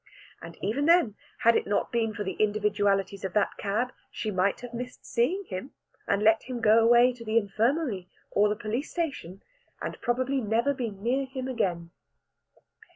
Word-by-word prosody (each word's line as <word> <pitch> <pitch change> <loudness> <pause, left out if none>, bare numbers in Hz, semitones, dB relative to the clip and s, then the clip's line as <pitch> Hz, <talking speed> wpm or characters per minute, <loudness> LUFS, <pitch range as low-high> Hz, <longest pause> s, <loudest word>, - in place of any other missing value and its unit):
And 165 0 -10
even 235 +9 0
then, 335 - +5 0.3
had 230 0 +5
it - - +1
not 205 - 0
been 230 -2 +1
for 205 - -3
the 190 -1 -3
individualities 205 -2 +1
of 190 - -3
that 210 - +2
cab, 225 +5 -1 0.2
she 215 - -4
might 190 +1 +1
have 245 -1 -8
missed 250 +1 -7
seeing 300 +12 0
him, 185 - -6 0.3
and 200 +1 +1
let 220 +1 +5
him 250 -1 -5
go 220 0 +5
away 240 +2 +6
to 240 -1 -11
the 220 0 0
infirmary 220 - 0 0.2
or 210 +1 +3
the 210 - 0
police 220 +7 -3
station, 265 - -4 0.4
and - - -6
probably 255 +2 0
never 230 +5 +1
been 220 -7 -5
near 260 +4 +1
him 260 -1 -5
again. 180 -9 -2
225 Hz, 175 wpm, -28 LUFS, 200-250 Hz, 0.4 s, away